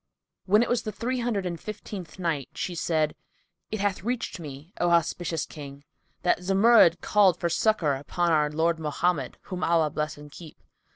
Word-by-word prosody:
When 210 +4 +5
it - - -2
was 240 -1 +1
the 215 - -4
Three 245 +5 -2
Hundred 230 -5 -1
and 170 -2 -3
Fifteenth 205 -3 -8
Night, 165 -7 -2
She 180 - -3
said, 160 -2 0 0.6
It 215 - -3
hath 200 -3 0
reached 235 -1 -3
me, 150 +3 -9
O 175 - +3
auspicious 170 -1 +1
King, 140 -2 -10 0.4
that 180 - +3
Zumurrud 195 -1 +5
called 200 -4 +4
for 170 - 0
succour 170 -4 +2
upon 170 +5 -1
our 150 -2 +3
Lord 160 +2 0
Mohammed 150 -2 -1
(whom 185 -2 -5
Allah 165 -3 +2
bless 150 0 -3
and 150 0 -12
keep!). 160 0 -12
170 Hz, 175 wpm, -26 LUFS, 155-200 Hz, 0.6 s, When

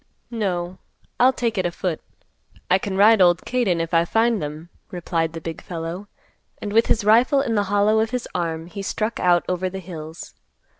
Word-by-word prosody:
"No, 185 -5 -3 0.4
I'll 255 +2 +6
take 230 -5 -2
it 185 - 0
a - - -2
foot. 170 -1 -3 0.7
I 185 - +5
can 190 -1 -4
ride 215 +1 +6
old 175 -2 +4
Kate 250 -2 0
in, 175 -2 +1
if 165 +1 -3
I 165 0 +4
find 225 +4 +1
them," 155 +3 -6 0.2
replied 165 -2 -2
the 165 - -5
big 165 0 -6
fellow; 170 +3 -6 0.5
and, 205 -1 -5
with 230 +1 +4
his 215 - +1
rifle 240 +6 +4
in 240 -4 -1
the 205 -2 +1
hollow 205 +2 +3
of 220 0 +1
his 250 0 -3
arm, 165 -2 -2
he 200 +4 -8
struck 215 +3 -3
out 175 -1 +3
over 185 +1 -1
the 190 - -7
hills. 165 -3 -9
185 Hz, 200 wpm, -22 LUFS, 170-220 Hz, 0.7 s, I'll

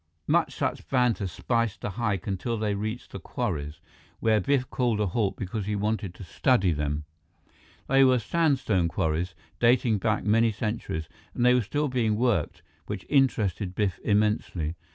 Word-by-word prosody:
More - - +3
such - - -3
banter 125 -6 +2
spiced 115 +1 -1
the 105 - -3
hike 100 -4 -2
until 110 +4 -2
they 105 -1 0
reached 110 +4 -4
the - - -6
quarries, 75 +1 -3 0.4
where 110 -1 +3
Biff 130 +4 +1
called 120 -4 +1
a 105 - +2
halt 100 +1 -1
because 100 +1 -4
he 105 - 0
wanted 105 -2 -2
to 95 - -10
study 95 - +2
them. 75 -1 -2 0.8
They 135 +1 +5
were 130 -1 +5
sandstone 130 - +1
quarries, 80 +2 -1 0.2
dating 120 -2 +3
back 110 +2 0
many 115 +2 +3
centuries, 105 -7 -3 0.3
and 120 - +1
they 125 - +6
were 125 - +4
still 145 +7 -1
being 120 -5 +1
worked, 110 -8 0 0.2
which 95 - -5
interested 105 - +1
Biff 95 -3 0
immensely. 105 -6 +1
105 Hz, 160 wpm, -27 LUFS, 95-120 Hz, 0.8 s, they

